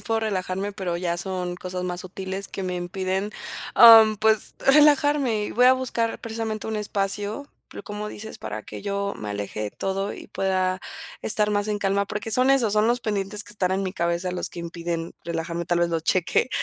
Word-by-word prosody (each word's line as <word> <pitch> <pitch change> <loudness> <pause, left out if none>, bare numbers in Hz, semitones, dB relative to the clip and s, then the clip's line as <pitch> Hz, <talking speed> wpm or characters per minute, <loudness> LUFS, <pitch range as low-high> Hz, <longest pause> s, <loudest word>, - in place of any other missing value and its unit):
sí - - -16
puedo 225 0 0
relajarme, 195 -1 -2
pero 185 -4 -3
ya 175 -1 -1
son 180 -1 -3
cosas 180 0 -5
más 180 0 -3
sutiles 190 +1 -5
que 195 - -6
me 180 -1 -2
impiden, 190 +3 -2 0.4
am, 220 -2 +9
pues 220 0 +2
relajarme, 290 -5 +4
y - - -6
voy 245 +2 +5
a 255 - +8
buscar 240 -3 -1
precisamente 220 -1 -4
un 220 0 -2
espacio, 205 +5 -2 0.2
pero, - - -9
como 210 +1 -5
dices, 220 +1 -8
para 110 0 -6
que - - -9
yo 200 0 -2
me 105 -1 -6
aleje 105 +1 -4
de 105 - -3
todo 195 +1 -3
y - - -10
pueda 185 -1 0 0.4
estar 210 0 +2
más 205 0 0
en 210 - -1
calma, 200 0 +1
porque 210 +2 -5
son 255 +1 +4
esos 245 -6 +3
son 215 +1 +3
los 240 +1 +1
pendientes 210 -1 -2
que 205 - -10
están 185 -3 0
en 190 +1 0
mi 185 - -3
cabeza 170 +1 -1
los 180 - -3
que - - -10
impiden 170 0 -4
relajarme, 170 0 -3
tal 175 0 +1
vez 175 - +2
lo 165 -1 -1
cheque, 180 +8 +1
195 Hz, 205 wpm, -24 LUFS, 180-215 Hz, 0.4 s, am